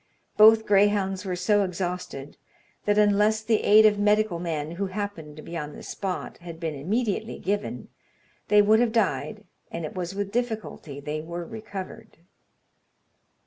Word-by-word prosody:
Both 220 Hz, +1 st, +7 dB
greyhounds 200 Hz, -1 st, +2 dB
were 185 Hz, -1 st, -2 dB
so 200 Hz, +3 st, +2 dB
exhausted, 180 Hz, -6 st, -5 dB, 0.5 s
that 205 Hz, 0 st, +2 dB
unless 210 Hz, +1 st, +3 dB
the 220 Hz, -1 st, +2 dB
aid 215 Hz, +1 st, +7 dB
of 210 Hz, -1 st, +4 dB
medical 210 Hz, -3 st, +2 dB
men, 160 Hz, -3 st, -3 dB
who 195 Hz, +4 st, -3 dB
happened 185 Hz, -6 st, -5 dB
to 155 Hz, -, -11 dB
be 170 Hz, -, -8 dB
on 150 Hz, -2 st, -5 dB
the -, -, -10 dB
spot, 190 Hz, -2 st, -5 dB
had 170 Hz, -2 st, -9 dB
been 165 Hz, -2 st, -3 dB
immediately 210 Hz, -, -2 dB
given, 200 Hz, -, -3 dB, 0.6 s
they 210 Hz, 0 st, +5 dB
would 215 Hz, +2 st, +5 dB
have 240 Hz, -1 st, +2 dB
died, 220 Hz, -1 st, -1 dB, 0.3 s
and 170 Hz, -1 st, -5 dB
it -, -, -7 dB
was 180 Hz, 0 st, -4 dB
with 200 Hz, 0 st, -3 dB
difficulty 220 Hz, -, -4 dB
they 150 Hz, +2 st, -4 dB
were 170 Hz, +2 st, -6 dB
recovered. 210 Hz, -3 st, -8 dB
200 Hz, 155 wpm, -26 LUFS, 170-210 Hz, 0.6 s, Both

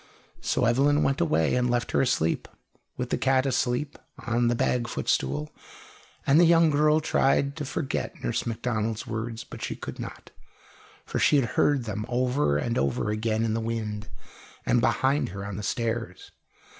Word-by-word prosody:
So 125 Hz, -, +1 dB
Evelyn 140 Hz, +5 st, +3 dB
went 135 Hz, -, +1 dB
away 80 Hz, -1 st, +2 dB
and 125 Hz, 0 st, +1 dB
left 120 Hz, 0 st, 0 dB
her -, -, +3 dB
asleep, 100 Hz, -11 st, 0 dB, 0.5 s
with 125 Hz, 0 st, -4 dB
the -, -, 0 dB
cat 130 Hz, 0 st, +2 dB
asleep 130 Hz, +2 st, -1 dB, 0.3 s
on 120 Hz, 0 st, +1 dB
the 120 Hz, -, +2 dB
bag 120 Hz, 0 st, 0 dB
footstool; 70 Hz, -, -1 dB, 0.7 s
and 140 Hz, +4 st, +5 dB
the 175 Hz, -, +7 dB
young 165 Hz, -1 st, +5 dB
girl 150 Hz, +1 st, +4 dB
tried 140 Hz, -2 st, +1 dB
to 150 Hz, -, -3 dB
forget 135 Hz, +1 st, -3 dB
Nurse -, -, -1 dB
Macdonald's 115 Hz, -1 st, -2 dB
words, 115 Hz, 0 st, -4 dB
but -, -, -11 dB
she -, -, -3 dB
could -, -, -8 dB
not, -, -, -8 dB, 0.7 s
for -, -, -3 dB
she 145 Hz, -2 st, +4 dB
heard 135 Hz, +2 st, +1 dB
them 105 Hz, -1 st, -4 dB
over 125 Hz, -, +1 dB
and 115 Hz, +10 st, -1 dB
over 70 Hz, +10 st, 0 dB
again 110 Hz, +1 st, 0 dB
in 110 Hz, -, 0 dB
the 115 Hz, -, -1 dB
wind, 110 Hz, -2 st, -4 dB, 0.6 s
and 120 Hz, -, +3 dB
behind 130 Hz, +4 st, +1 dB
her 95 Hz, +2 st, -6 dB
on 100 Hz, -1 st, -5 dB
the -, -, -4 dB
stairs. 115 Hz, -3 st, -3 dB
120 Hz, 170 wpm, -26 LUFS, 110-135 Hz, 0.7 s, the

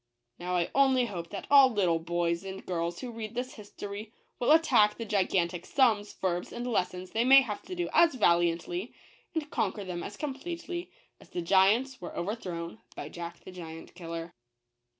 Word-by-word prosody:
Now 180 Hz, +1 st, -2 dB
I 175 Hz, -1 st, 0 dB
only 265 Hz, -2 st, +4 dB
hope 175 Hz, -6 st, -6 dB
that 200 Hz, -, -6 dB
all 275 Hz, -2 st, +9 dB
little 185 Hz, -8 st, +2 dB
boys 170 Hz, +1 st, -1 dB
and 195 Hz, 0 st, -7 dB
crirls 170 Hz, -1 st, -2 dB
who 250 Hz, -, -5 dB
read 225 Hz, -1 st, -6 dB
this 250 Hz, +1 st, -3 dB
his 205 Hz, -1 st, -12 dB
tory, 205 Hz, +2 st, -7 dB, 0.3 s
will 245 Hz, -, +3 dB
attack 245 Hz, -10 st, +5 dB
the 230 Hz, -, -4 dB
gigantic 185 Hz, -4 st, +1 dB
sums, 220 Hz, -7 st, +2 dB
verbs, 180 Hz, -2 st, -2 dB
and 240 Hz, -, -5 dB
lessons 185 Hz, -5 st, -1 dB
they 225 Hz, -, +1 dB
may 270 Hz, +2 st, +8 dB
have 215 Hz, -6 st, -4 dB
to 365 Hz, -, -7 dB
do 350 Hz, -1 st, -1 dB
as 335 Hz, -5 st, +5 dB
valiantly, 175 Hz, 0 st, +1 dB, 0.4 s
and 315 Hz, -2 st, -1 dB
conquer 205 Hz, -, -1 dB
them 180 Hz, -2 st, -5 dB
as 205 Hz, -, -7 dB
completely, 340 Hz, +5 st, -5 dB, 0.3 s
as -, -, -17 dB
the 175 Hz, -, -4 dB
giants 205 Hz, +9 st, +3 dB
were -, -, -7 dB
over 195 Hz, +5 st, -1 dB
thrown 175 Hz, -3 st, -6 dB, 0.2 s
by -, -, -6 dB
Jack 170 Hz, 0 st, -8 dB
the -, -, -10 dB
Giant 165 Hz, -3 st, -9 dB
kille 170 Hz, -2 st, -7 dB
R. 165 Hz, 0 st, -6 dB
200 Hz, 190 wpm, -29 LUFS, 175-250 Hz, 0.4 s, all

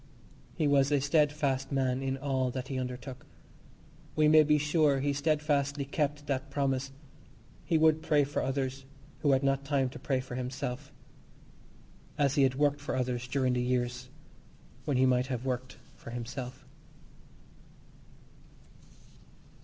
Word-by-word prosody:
He 160 Hz, -, 0 dB
was 140 Hz, 0 st, +3 dB
a 145 Hz, -, +4 dB
steadfast 140 Hz, -2 st, +1 dB
man 130 Hz, -1 st, 0 dB
in 135 Hz, 0 st, -2 dB
all 135 Hz, -2 st, 0 dB
that 130 Hz, +1 st, -5 dB
he 130 Hz, -2 st, -2 dB
undertook. 125 Hz, 0 st, -6 dB, 0.9 s
We 155 Hz, -1 st, +4 dB
may 155 Hz, +1 st, +7 dB
be 150 Hz, 0 st, +4 dB
sure 150 Hz, -1 st, +2 dB
he 140 Hz, +1 st, 0 dB
steadfastly 145 Hz, -1 st, 0 dB
kept 145 Hz, +1 st, -2 dB
that 140 Hz, -1 st, -2 dB
promise. 135 Hz, -1 st, -1 dB, 0.7 s
He 165 Hz, -, +2 dB
would 160 Hz, 0 st, +4 dB
pray 150 Hz, -2 st, +3 dB
for 140 Hz, +1 st, -2 dB
others, 135 Hz, 0 st, -2 dB, 0.3 s
who 145 Hz, -2 st, +3 dB
had 135 Hz, +1 st, +2 dB
not 135 Hz, 0 st, +1 dB
time 140 Hz, -2 st, +1 dB
to -, -, -10 dB
pray 135 Hz, -1 st, 0 dB
for 130 Hz, -1 st, -7 dB
himself, 130 Hz, +2 st, -4 dB, 1.3 s
as 140 Hz, -2 st, +2 dB
he 145 Hz, -, +2 dB
had 130 Hz, -1 st, +3 dB
worked 145 Hz, 0 st, +1 dB
for 145 Hz, -, -3 dB
others 125 Hz, -1 st, -2 dB
during 130 Hz, 0 st, +1 dB
the 125 Hz, -, 0 dB
years 125 Hz, 0 st, -1 dB, 0.8 s
when 140 Hz, -3 st, +1 dB
he 130 Hz, -, +4 dB
might 125 Hz, 0 st, +2 dB
have 125 Hz, -1 st, -4 dB
worked 130 Hz, 0 st, -3 dB, 0.2 s
for -, -, -11 dB
himself. 125 Hz, +2 st, -6 dB
135 Hz, 145 wpm, -30 LUFS, 130-145 Hz, 1.3 s, may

